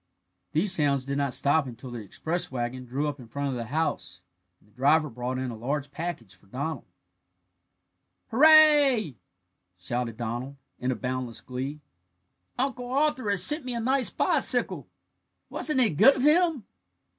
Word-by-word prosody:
These 175 +6 +1
sounds 140 -6 +2
did 140 +1 -2
not 140 -2 -1
stop 145 +2 +2
until 125 +1 -9
the 120 - -6
express 165 - -4
wagon 125 0 -4
drew 135 +5 -2
up 145 -1 -5
in 120 - -12
front 140 +4 -3
of - - -3
the 120 -1 -4
house, 135 - -3 0.4
and - - -29
the 105 - -28
driver 150 +5 +2
brought 125 +2 -4
in 130 -1 -3
a - - -7
large 140 +5 -4
package 145 - -6
for - - -22
Donald. 140 +5 -5 1.5
"Hurrah!" 290 - +6 0.7
shouted 115 +5 -4
Donald, 120 +4 -5 0.2
in 125 +1 -1
boundless 125 -2 -4
glee. 135 +4 -6 0.8
"Uncle 250 -1 -3
Arthur 275 -4 0
has 200 -3 +2
sent 300 - +3
me 250 -1 -4
a - - -2
nice 260 +2 +2
bicycle! - - +2 0.6
Wasn't 300 -4 0
it 240 -6 +3
good 265 - +5
of 255 - -3
him?" 315 - +3
145 Hz, 155 wpm, -26 LUFS, -, 1.5 s, Hurrah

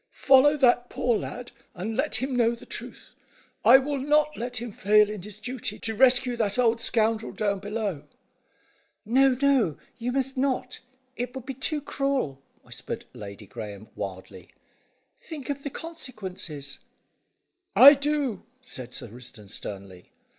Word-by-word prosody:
"Follow 280 +2 +6
that 245 -2 +3
poor 240 -2 +1
lad, 245 +3 -5 0.2
and 205 +5 -4
let 275 +5 0
him 260 0 -1
know 235 -1 +3
the - - -14
truth. - - -8 0.5
I - - +9
will 280 +1 -2
not 300 +2 +2
let 245 +2 -4
him 235 0 -4
fail 210 +1 +4
in 210 -3 -6
his 210 +2 -9
duty, 250 +2 -4
to 225 - -1
rescue 250 +1 +4
that 210 -2 0
old 230 -2 +2
scoundrel 225 -1 +1
down 200 -2 -1
below." 205 -5 -3 1.0
"No, 260 +3 +4
no! 270 - +3 0.2
You 240 +2 -2
must 270 0 -1
not. 255 -1 -1 0.4
It 245 +1 -4
would 260 -2 -7
be 270 - -4
too 295 +4 -1
cruel," 275 - -2 0.2
whispered - - -7
Lady 105 0 -9
Graeme 105 0 -8
wildly. 95 -2 -7 0.7
"Think 295 -3 -6
of 280 0 -5
the 285 - -4
consequences." 190 - -6 1.0
"I 280 +3 +11
do," 285 -6 -1 0.2
said 130 - -8
Sir - - -5
Risdon 115 -3 -11
sternly. 95 -3 -8
240 Hz, 145 wpm, -26 LUFS, 190-265 Hz, 1.0 s, I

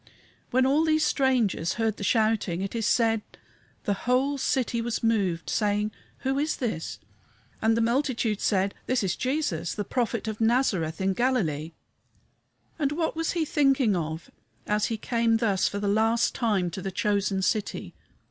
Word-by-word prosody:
When 255 +1 +3
all 285 +4 +3
these 310 -1 +2
strangers 245 - +1
heard 220 0 -1
the - - -6
shouting, 215 -4 +1
it 195 - -4
is 225 -2 -1
said 225 -2 +2 0.6
the 205 - +1 0.2
"whole 275 +3 +2
city 250 -3 0
was 235 0 -3
moved, 195 -7 +1
saying, 210 0 0 0.3
Who 270 +1 0
is 305 +2 0
this? 215 -10 -3 0.6
And 225 +1 +3
the - - +2
multitude 235 -3 0
said, 195 -1 +1
This 255 -3 +1
is 185 -2 0
Jesus, 255 - -1
the 205 - -2
Prophet 230 0 -2
of 220 0 -4
Nazareth 205 -9 +1
in 190 0 +1
Galilee." 175 - 0 1.1
And 285 -1 +1
what 320 +1 -1
was 325 0 -1
He 335 -2 0
thinking 275 -8 +3
of, 160 -1 -4 0.3
as 210 0 +1
he 225 - -2
came 230 0 +1
thus 205 -5 +1
for 205 - -3
the 205 0 -2
last 225 +3 +2
time 200 -7 0
to 190 - -6
the 195 - -3
chosen 200 0 0
city? 210 +1 -1
225 Hz, 165 wpm, -26 LUFS, 195-255 Hz, 1.1 s, When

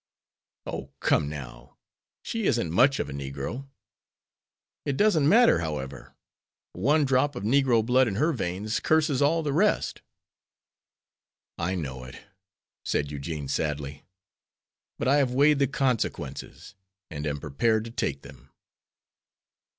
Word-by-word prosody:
"Oh, - - -5
come 75 -2 +2
now; 75 -5 -9 0.5
she 225 -2 -3
isn't 115 - +1
much 130 - +4
of - - -1
a - - -7
negro." 70 - -5 1.2
"It 140 -2 -2
doesn't 165 -9 +4
matter, 235 +5 +6
however. 75 -5 -5 0.6
One 150 +3 +2
drop 135 +1 +2
of 125 - -5
negro 120 -1 +3
blood 125 +2 +4
in 100 - -2
her 155 +9 +2
veins 100 -1 -2
curses 155 -4 +2
all 160 +3 +3
the 145 -2 -1
rest." 205 +8 +1 1.6
"I 90 +2 -1
know 65 -7 -5
it," 60 - -11 0.6
said 75 0 -1
Eugene, 75 0 -5
sadly, 70 0 -3 0.9
"but 115 - -2
I 140 +2 +5
have 130 -3 +1
weighed 145 +1 +4
the 140 - +3
consequences, 130 -6 -3 0.4
and 75 -1 -4
am 75 0 -2
prepared 110 +11 0
to 115 - -8
take 70 - -2
them." - - -14
115 Hz, 130 wpm, -27 LUFS, -, 1.6 s, matter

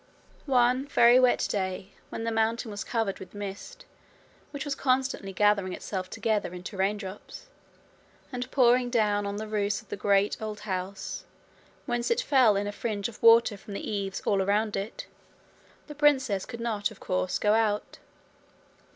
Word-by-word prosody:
One 255 +1 +3
very 240 -2 +6
wet 250 -1 +3
day, 190 0 -3 0.2
when 225 - -5
the 230 - -1
mountain 225 0 0
was 205 - -5
covered 225 -5 -2
with 190 - -11
mist 205 - -7 0.6
which 285 0 -6
was 290 - -1
constantly 260 -7 0
gathering 200 -1 +2
itself 185 -1 -5
together 210 -5 -1
into 180 +4 -8
raindrops, 195 - -4 0.8
and 250 0 -4
pouring 245 -2 +4
down 210 -4 +1
on 200 - -3
the 215 +1 -5
roofs 205 -1 0
of 220 - -18
the - - -3
great 200 +1 +1
old 215 -1 -5
house, 190 -1 -4 0.6
whence 240 0 -1
it 470 +1 +2
fell 255 - +4
in 200 +1 0
a 205 - -3
fringe 205 0 -3
of 225 - -14
water 230 -1 +6
from 200 +1 -9
the - - -5
eaves 195 -2 -3
all 200 - +2
round 210 +2 +1
about 195 - 0
it, - - -9 0.8
the 300 - -9
princess 265 -9 +2
could 235 - -7
not 215 -3 -1
of 220 - -14
course 185 0 -1
go 210 0 +2
out. 215 -2 0
215 Hz, 170 wpm, -28 LUFS, 200-240 Hz, 0.8 s, very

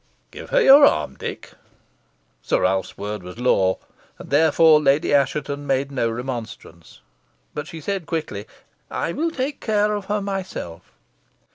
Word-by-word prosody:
Give - - -10
her - - +3
your 280 -2 +8
arm, 75 -1 +3
Dick." - - -7 0.9
Sir - - 0
Ralph's 95 0 0
word 105 0 -5
was 90 +3 -10
law, 95 -7 +2 0.4
and - - -12
therefore 155 +1 +5
Lady 140 +1 +2
Assheton 145 +1 0
made 135 +1 0
no 125 -4 0
remonstrance. 115 -8 -7 0.5
But 150 +1 -5
she 160 0 -9
said 190 0 -3
quickly, 150 -11 -4 0.4
"I - - -2
will 325 - -1
take 280 -2 -4
care 210 -1 +1
of 205 -2 -4
her 210 +1 -1
myself." 190 - -6
145 Hz, 145 wpm, -22 LUFS, -, 0.9 s, your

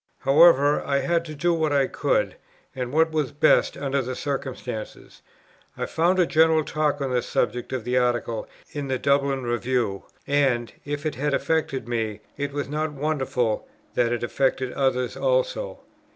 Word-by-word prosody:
However, 145 0 +5
I 140 - +1
had 170 -1 +1
to 155 -2 -7
do 175 +4 +1
what 160 -2 0
I 140 -2 +3
could, - - 0 0.4
and 125 -1 -3
what 160 +2 +3
was 155 -4 -1
best, 150 +2 +3
under 140 -1 0
the 130 0 -4
circumstances; 130 -6 -5 0.6
I - - -2
found 175 +3 +1
a 180 - +4
general 160 0 +4
talk 150 -1 -1
on 135 -2 -1
the 125 -1 +2
subject 120 +1 -1
of 130 -3 -3
the 125 +2 +1
Article 120 -2 -1 0.2
in 145 -2 -4
the 130 -1 0
Dublin 140 -1 +1
Review; 120 -4 -1 0.2
and, 135 -5 +1
if 145 +1 -4
it 155 - 0
had 145 +3 0
affected 145 -7 -1
me, 110 -3 -2
it 140 0 -3
was 145 0 -3
not 150 +1 -2
wonderful, 135 -6 -1 0.3
that 120 -1 +2
it 120 -1 -2
affected 130 +1 0
others 125 -2 0
also. - - -1
140 Hz, 165 wpm, -24 LUFS, 125-155 Hz, 0.6 s, However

